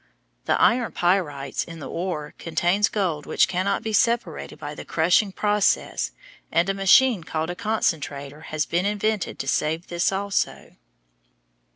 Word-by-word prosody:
The - - +1
iron 240 0 +3
pyrites 155 -7 0
in 165 0 -10
the 150 - -7
ore 170 -4 -4
contains 175 +5 +1
gold 175 -8 -2
which - - +3
cannot 185 +2 -1
be 220 - -3
separated 225 -8 0
by 145 0 -6
the - - -8
crushing 175 +5 +2
process 205 - +1 0.4
and 170 +3 +2
a - - +2
machine 195 +2 +4
called 160 +1 -3
a - - -6
concentrator 150 -9 -2
has 155 -1 -1
been 175 +3 0
invented 210 0 -1
to 135 - -5
save 160 +5 -1
this 175 +2 +1
also. 200 +1 -2
175 Hz, 150 wpm, -24 LUFS, 155-200 Hz, 0.4 s, machine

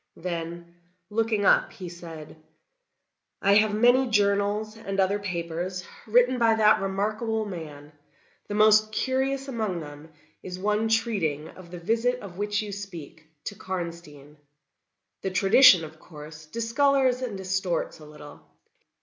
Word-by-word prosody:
Then 170 0 -6 0.4
looking 220 -1 0
up, - - +4
he 185 - -8
said: 165 -3 -10 1.0
"I 200 - +3
have 215 0 +4
many 245 +4 +4
journals, 205 0 +1
and 195 -3 -5
other 195 +2 +2
papers, 180 -1 -4 0.2
written 245 +3 +3
by 230 -1 +4
that 215 -1 +4
remarkable 215 +3 -1
man; 155 -6 -8 0.6
the 205 - -4
most 215 0 +5
curious 265 +3 -1
among 220 -9 -2
them 150 +1 -11 0.3
is 180 -1 -7
one 210 +3 0
treating 195 -10 0
of 185 -2 -14
the 175 - -8
visit 230 +8 0
of 190 -2 -10
which 205 +1 -1
you 210 - -6
speak, 170 -6 -9 0.2
to - - -5
Karnstein. 170 -7 -7 0.8
The 190 - -2
tradition, 195 -1 +6
of 155 0 -13
course, 155 -1 -12
discolors 255 - +1
and 235 -6 -4
distorts 190 -3 -2
a 155 - -12
little. 150 -1 -13
200 Hz, 135 wpm, -26 LUFS, 170-220 Hz, 1.0 s, tradition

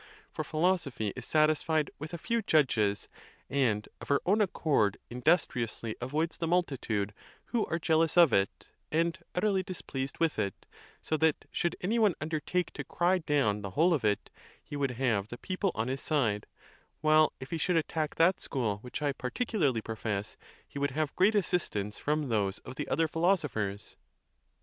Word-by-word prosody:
For - - -3
philosophy 155 - 0
is 125 - -7
satisfied 155 0 +2
with 150 +2 -6
a 170 - -4
few 230 +7 -1
judges, 120 - +2 0.4
and 120 -7 +1
of - - -8
her 140 - +3
own 205 +4 +3
accord 150 - +2
industriously 120 -4 0
avoids 155 +6 -1
the 165 - -2
multitude, 130 - 0 0.3
who 235 -3 -1
are 165 - -1
jealous 160 0 +2
of 170 -4 +7
it, 100 0 0 0.2
and 165 +1 +2 0.2
utterly 195 +1 +2
displeased 140 -8 -5
with 165 -2 +1
it; 100 -2 -3 0.4
so 155 - 0
that, 160 0 +2
should 175 -1 0
any 220 +6 +1
one 210 -6 +4
undertake 160 +3 -2
to - - -5
cry 180 +2 +1
down 140 -11 +1
the 100 - -4
whole 170 +3 +5
of 150 - 0
it, 105 -1 0 0.3
he 145 - -8
would 140 -1 0
have 115 -6 +1
the 120 - -7
people 185 +4 -1
on 110 +2 -1
his 135 +1 -2
side; 115 -10 0 0.5
while, 155 0 +5
if 130 - -9
he 165 - -2
should 180 +2 +2
attack 155 -1 -1
that 175 +3 +4
school 115 -7 -1
which 125 +6 -6
I 145 - +2
par 125 -1 -4
ticularly 150 - 0
profess, 105 -2 -3 0.3
he 140 - -7
would 140 0 +1
have 155 -2 -1
great 200 +4 +4
assistance 155 - 0
from 150 -2 0
those 100 -3 +1
of - - -7
the - - -4
other 165 0 +2
philosophers. 150 - -1
150 Hz, 175 wpm, -30 LUFS, 115-170 Hz, 0.5 s, of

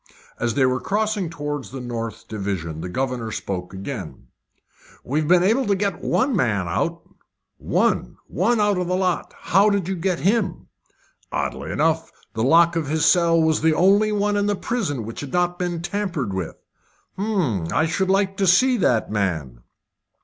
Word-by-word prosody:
As 120 -2 -1
they 135 - +4
were 130 0 +1
crossing 210 -3 -1
towards 145 -3 -5
the 135 - -7
north 115 -3 -5
division 95 -7 -4
the 90 - -5
governor 125 +1 -2
spoke 90 -4 -4
again: 100 +4 -7 0.7
"We've 150 +3 -1
been 175 +1 +5
able 225 +6 +2
to 200 - +3
get 195 -2 -2
one 260 -1 +1
man 105 - +1
out." 170 - -2 0.5
"One! - - 0 0.2
out 205 -1 +2
of 180 - -2
the 180 - 0
lot! 185 -2 -1
How 195 +4 +3
did 200 -4 0
you 190 - -1
get 180 0 -1
him?" 195 -3 0 0.6
"Oddly - - -3
enough, 160 +1 0 0.2
the 110 - -3
lock 170 +7 +5
of 165 -4 -1
his 155 +2 +1
cell 170 -2 +4
was 160 -1 +2
the 160 0 +3
only 200 +5 +4
one 205 0 +1
in 205 0 +1
the 205 - +1
prison 185 - -2
which 115 - -7
had 140 -2 -7
not 175 0 +1
been 175 -2 -2
tampered 175 - -2
with." 95 -4 -4 0.6
"Hum! 180 - -1
I 160 - +2
should 190 +3 -1
like 195 0 +1
to 195 - +1
see 250 +8 +5
that 120 - +1
man." 80 - -2
165 Hz, 170 wpm, -22 LUFS, 120-195 Hz, 0.7 s, been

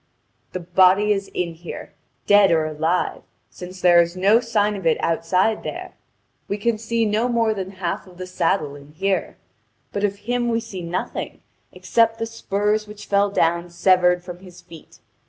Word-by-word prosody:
The 185 - -3
body 185 +4 +4
is 195 -1 -4
in 170 -2 -2
here, 165 +1 -9 0.3
dead 205 -1 +6
or 160 -2 +2
alive, 160 +3 -1 0.3
since 185 +1 -10
there 175 -1 +6
is 170 +1 -3
no 200 +5 +4
sign 210 -3 0
of 190 -4 -3
it 160 - +3
outside 180 +6 +1
there; - - -7 0.5
we 200 - -2
can 220 +1 0
see 230 0 0
more 225 +1 +1
than 190 -2 -5
half 185 -1 -4
of 180 -1 -16
the 185 - -6
saddle 170 -5 -1
in 145 +1 -14
here, 190 +2 -1 0.6
but 200 - -2
of 200 -1 +1
him 245 0 0
we 230 0 +1
see 190 -5 -7
nothing, 170 +2 -5 0.3
except 225 -1 +1
the 225 - -2
spurs 215 -1 -1
which 210 0 -10
fell 200 0 +2
down 170 -2 0
severed 180 0 +3
from 180 -1 -9
his 180 -2 -14
feet. 170 -3 -15
190 Hz, 175 wpm, -22 LUFS, 175-210 Hz, 0.6 s, dead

